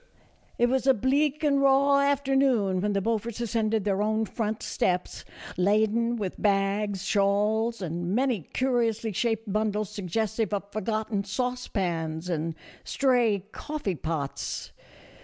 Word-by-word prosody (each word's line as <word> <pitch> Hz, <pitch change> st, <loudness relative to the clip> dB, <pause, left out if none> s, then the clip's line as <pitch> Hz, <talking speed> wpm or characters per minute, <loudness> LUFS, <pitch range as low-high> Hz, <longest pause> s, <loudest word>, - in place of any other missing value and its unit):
It 240 Hz, -, +4 dB
was 265 Hz, +1 st, 0 dB
a 265 Hz, -, +6 dB
bleak 285 Hz, +6 st, +1 dB
and 280 Hz, -2 st, +3 dB
raw 275 Hz, +1 st, +5 dB
afternoon 270 Hz, -8 st, +2 dB
when 205 Hz, +1 st, 0 dB
the 195 Hz, -, +1 dB
Beau 225 Hz, +2 st, +1 dB
forts 230 Hz, +1 st, -7 dB
ascended 225 Hz, -2 st, 0 dB
their 200 Hz, 0 st, 0 dB
own 215 Hz, +1 st, +1 dB
front 215 Hz, 0 st, -3 dB
steps, 180 Hz, 0 st, -1 dB, 0.3 s
laden 215 Hz, +5 st, +2 dB
with 200 Hz, -5 st, -4 dB
bags, 200 Hz, -1 st, +1 dB
shawls, 210 Hz, +3 st, +1 dB
and 175 Hz, +3 st, -2 dB
many 250 Hz, -5 st, +1 dB
curiously 230 Hz, -, 0 dB
shaped 225 Hz, 0 st, -1 dB
bundles 215 Hz, -1 st, 0 dB
suggestive 210 Hz, +2 st, -1 dB
of 200 Hz, 0 st, -6 dB
forgotten 215 Hz, -1 st, -2 dB
saucepans 185 Hz, -8 st, -2 dB
and 165 Hz, -1 st, -2 dB, 0.3 s
stray 240 Hz, -8 st, +2 dB
coffee 295 Hz, -11 st, -3 dB
pots. 155 Hz, -4 st, -4 dB
215 Hz, 130 wpm, -27 LUFS, 195-240 Hz, 0.3 s, a